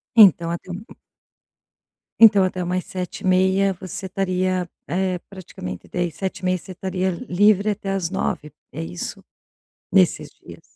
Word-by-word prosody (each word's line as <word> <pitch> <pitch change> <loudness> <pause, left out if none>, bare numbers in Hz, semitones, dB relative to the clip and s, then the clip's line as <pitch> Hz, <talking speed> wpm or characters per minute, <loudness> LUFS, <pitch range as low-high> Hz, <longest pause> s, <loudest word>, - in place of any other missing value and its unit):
Então, 180 -6 +7
até 170 +2 -6
um 180 +4 -6 1.4
Então, 210 -4 +8
até 185 -1 -1
umas 180 +1 -2
7h30 190 +1 +1
você 185 +1 -6
estaria, 185 -1 -1 0.2
eh, 185 +3 -1
praticamente 130 - -8
de 175 -2 -2
7h30 185 0 -2
você 185 - -11
estaria 185 0 -2 0.2
livre 205 +2 +4
até 200 -1 -4
às 185 -4 -1
9h, 155 -5 -2 0.2
é - - -5
isso, 85 +2 -6 0.7
nesses - - +3
dias? - - -14
185 Hz, 130 wpm, -22 LUFS, 180-195 Hz, 1.4 s, Então